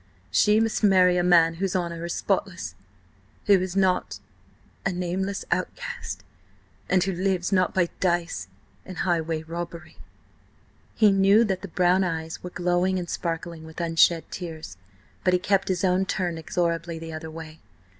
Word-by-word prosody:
She 210 Hz, +1 st, +4 dB
must 225 Hz, 0 st, 0 dB
marry 185 Hz, -3 st, +5 dB
a 175 Hz, -, +2 dB
man 170 Hz, -2 st, +5 dB
whose 195 Hz, 0 st, 0 dB
honour 170 Hz, -2 st, -2 dB
is 170 Hz, -, -3 dB
spotless; -, -, -2 dB, 0.7 s
who 200 Hz, -2 st, +6 dB
is 185 Hz, 0 st, -3 dB
not–a 100 Hz, -, -3 dB
nameless 185 Hz, +2 st, -2 dB
outcast, -, -, -3 dB, 0.7 s
and 185 Hz, -1 st, +3 dB
who 195 Hz, -, -1 dB
lives–not–by 185 Hz, -1 st, +1 dB
dice–and 170 Hz, -, -3 dB
highway 165 Hz, -3 st, 0 dB
robbery." 170 Hz, 0 st, -7 dB, 1.0 s
He 215 Hz, -2 st, +5 dB
knew 195 Hz, +3 st, +5 dB
that 190 Hz, -4 st, -1 dB
the 200 Hz, -, -6 dB
brown 180 Hz, +1 st, +2 dB
eves 160 Hz, -2 st, -3 dB
were 180 Hz, -, -6 dB
glowing 180 Hz, +1 st, +1 dB
and 175 Hz, -1 st, -3 dB
sparkling 165 Hz, -1 st, -4 dB
with 160 Hz, +1 st, -10 dB
unshed 165 Hz, 0 st, +3 dB
tears, 160 Hz, -, -7 dB, 0.5 s
but 180 Hz, -, +3 dB
he 180 Hz, -, +4 dB
kept 195 Hz, +1 st, +1 dB
his 185 Hz, -1 st, -1 dB
own 185 Hz, 0 st, +2 dB
turned 175 Hz, -4 st, -2 dB
inexorably 170 Hz, 0 st, -1 dB
the 165 Hz, 0 st, -7 dB
other 160 Hz, 0 st, -6 dB
way. 160 Hz, 0 st, -9 dB
175 Hz, 145 wpm, -25 LUFS, 165-190 Hz, 1.0 s, who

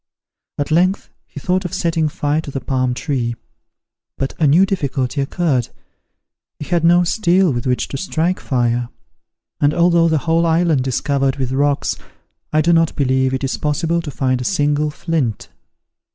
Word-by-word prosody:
At 145 Hz, +1 st, -2 dB
length 180 Hz, -, +1 dB, 0.2 s
he 90 Hz, -, -9 dB
thought 185 Hz, +5 st, 0 dB
of 180 Hz, -, -4 dB
setting 165 Hz, -2 st, 0 dB
fire 145 Hz, +1 st, -1 dB
to 155 Hz, -, -9 dB
the 135 Hz, -, -4 dB
palm 130 Hz, -2 st, -1 dB
tree; 125 Hz, -4 st, -2 dB, 0.8 s
but 135 Hz, -, -2 dB
a 155 Hz, -, +3 dB
new 165 Hz, +7 st, +5 dB
difficulty 140 Hz, -8 st, -2 dB
occurred: 135 Hz, -4 st, 0 dB, 0.9 s
he 150 Hz, -, -7 dB
had 175 Hz, 0 st, 0 dB
no 175 Hz, +1 st, +5 dB
steel 180 Hz, -3 st, +2 dB
with 120 Hz, +1 st, -3 dB
which 125 Hz, 0 st, 0 dB
to 135 Hz, -, -4 dB
strike 175 Hz, +3 st, -1 dB
fire; 120 Hz, -2 st, -1 dB, 0.7 s
and 145 Hz, +1 st, +2 dB
although 170 Hz, -1 st, +4 dB
the 160 Hz, -1 st, +2 dB
whole 165 Hz, +1 st, +2 dB
island 160 Hz, -5 st, +2 dB
is 130 Hz, -, -1 dB
covered 135 Hz, -2 st, 0 dB
with 130 Hz, -2 st, -3 dB
rocks, 140 Hz, +1 st, 0 dB, 0.5 s
I 155 Hz, -, +3 dB
do 170 Hz, +2 st, +3 dB
not 165 Hz, -1 st, +2 dB
believe 130 Hz, -2 st, +1 dB
it 130 Hz, +1 st, -3 dB
is 135 Hz, -, -1 dB
possible 165 Hz, +3 st, 0 dB
to 160 Hz, -, -7 dB
find 130 Hz, -2 st, -1 dB
a -, -, -3 dB
single 150 Hz, -2 st, +1 dB
flint. 150 Hz, -, -2 dB
150 Hz, 170 wpm, -18 LUFS, 130-170 Hz, 0.9 s, new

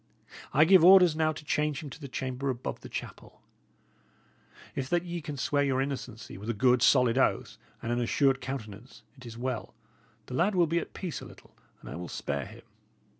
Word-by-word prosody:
I 150 Hz, +3 st, +5 dB
give 185 Hz, 0 st, +6 dB
orders 180 Hz, -3 st, +8 dB
now 155 Hz, 0 st, +2 dB
to 155 Hz, -1 st, -9 dB
change 150 Hz, +1 st, -1 dB
him 145 Hz, -, -8 dB
to 150 Hz, -, -11 dB
the 140 Hz, -, -6 dB
chamber 130 Hz, +1 st, -3 dB
above 125 Hz, -1 st, -4 dB
the -, -, -10 dB
chapel. -, -, -8 dB, 1.3 s
If 130 Hz, -1 st, -4 dB
that 175 Hz, 0 st, +1 dB
ye 170 Hz, -1 st, -4 dB
can 150 Hz, -2 st, -6 dB
swear 145 Hz, +2 st, +1 dB
your 135 Hz, -2 st, +1 dB
innocency 130 Hz, -7 st, -5 dB
with 105 Hz, +3 st, -7 dB
a 115 Hz, -, -1 dB
good, 125 Hz, +2 st, +3 dB
solid 125 Hz, -1 st, +4 dB
oath -, -, 0 dB, 0.2 s
and 120 Hz, -, -2 dB
an 120 Hz, +1 st, 0 dB
assured 135 Hz, +2 st, +2 dB
countenance, 115 Hz, -3 st, -7 dB
it 130 Hz, -3 st, -12 dB
is 115 Hz, 0 st, -9 dB
well; 125 Hz, -1 st, -4 dB, 0.5 s
the -, -, -9 dB
lad 180 Hz, +9 st, +1 dB
will 175 Hz, -2 st, +4 dB
be 165 Hz, +2 st, 0 dB
at -, -, -8 dB
peace 180 Hz, -5 st, -5 dB
a -, -, -8 dB
little, -, -, -16 dB, 0.3 s
and -, -, -13 dB
I -, -, -6 dB
will 90 Hz, 0 st, -6 dB
spare 70 Hz, -2 st, -3 dB
him. -, -, -13 dB
135 Hz, 205 wpm, -29 LUFS, 125-155 Hz, 1.3 s, orders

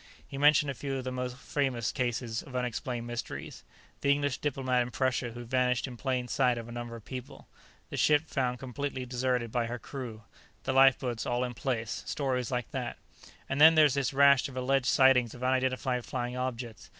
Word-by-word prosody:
He -, -, -9 dB
mentioned 145 Hz, 0 st, +4 dB
a -, -, -4 dB
few 135 Hz, +1 st, -4 dB
of 130 Hz, -, -4 dB
the 130 Hz, -, -3 dB
more 125 Hz, 0 st, -2 dB
famous 125 Hz, -2 st, -2 dB
cases 120 Hz, -3 st, -2 dB
of 130 Hz, -, -11 dB
unexplained 125 Hz, 0 st, -2 dB
mysteries 120 Hz, -1 st, -6 dB, 0.4 s
the 140 Hz, -, 0 dB
English 145 Hz, -1 st, 0 dB
diplomat 130 Hz, -3 st, 0 dB
in 120 Hz, -, -2 dB
Prussia 125 Hz, -1 st, -1 dB
who 120 Hz, +1 st, -7 dB
vanished 125 Hz, 0 st, +1 dB
in 130 Hz, -3 st, -7 dB
plain 125 Hz, 0 st, -2 dB
sight 125 Hz, -1 st, +2 dB
of 115 Hz, -1 st, -6 dB
a -, -, -9 dB
number 120 Hz, 0 st, -6 dB
of 115 Hz, -, -11 dB
people, 130 Hz, -1 st, -8 dB, 0.4 s
the -, -, -4 dB
ship 150 Hz, 0 st, +4 dB
found 125 Hz, -4 st, -1 dB
completely 130 Hz, +1 st, -4 dB
deserted 125 Hz, -2 st, -1 dB
by 120 Hz, -1 st, 0 dB
her 120 Hz, +1 st, -4 dB
crew, 120 Hz, -2 st, -7 dB, 0.4 s
the -, -, -1 dB
lifeboats 130 Hz, -3 st, +4 dB
all 120 Hz, +1 st, 0 dB
in 125 Hz, -1 st, -3 dB
place; 115 Hz, -3 st, -3 dB
stories 130 Hz, -4 st, -1 dB
like 125 Hz, -3 st, -3 dB
that. -, -, -4 dB, 0.5 s
"And 135 Hz, +2 st, -1 dB
there's 155 Hz, -3 st, +8 dB
this 140 Hz, -2 st, 0 dB
rash 140 Hz, -1 st, +5 dB
of 130 Hz, -, -10 dB
alleged 130 Hz, 0 st, +1 dB
sightings 130 Hz, -4 st, +4 dB
of 125 Hz, -, -9 dB
unidentified 130 Hz, -1 st, 0 dB
flying 125 Hz, 0 st, -3 dB
objects. 125 Hz, -3 st, -5 dB
125 Hz, 190 wpm, -30 LUFS, 120-135 Hz, 0.5 s, there's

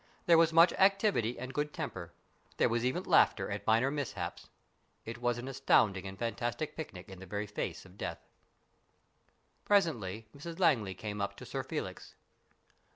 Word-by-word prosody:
There 170 Hz, -, +6 dB
was 165 Hz, -1 st, +5 dB
much 165 Hz, +2 st, +6 dB
activity 195 Hz, -, +3 dB
and 130 Hz, +1 st, -6 dB
good 150 Hz, 0 st, -2 dB
temper. -, -, -5 dB, 0.5 s
There -, -, +3 dB
was 115 Hz, 0 st, 0 dB
even 125 Hz, +1 st, 0 dB
laughter -, -, +3 dB
at -, -, -5 dB
minor 115 Hz, +5 st, +3 dB
mishaps. 145 Hz, -3 st, -4 dB, 0.6 s
It 115 Hz, +1 st, -6 dB
was 120 Hz, -1 st, 0 dB
an 120 Hz, +2 st, -6 dB
astounding 110 Hz, -8 st, +2 dB
and 95 Hz, 0 st, -8 dB
fantastic 120 Hz, +6 st, -3 dB
picnic 95 Hz, -, -7 dB
in 95 Hz, -1 st, -10 dB
the 95 Hz, -, -10 dB
very 100 Hz, +3 st, -3 dB
face 105 Hz, -2 st, -5 dB
of 95 Hz, +1 st, -17 dB
death. -, -, -5 dB, 1.4 s
Presently 115 Hz, -, +1 dB
Mrs 165 Hz, +4 st, -8 dB
Langley 115 Hz, -, +2 dB
came 105 Hz, +1 st, -5 dB
up 100 Hz, -, -2 dB
to -, -, -9 dB
Sir -, -, -3 dB
Felix. -, -, -6 dB
120 Hz, 160 wpm, -32 LUFS, 105-155 Hz, 1.4 s, There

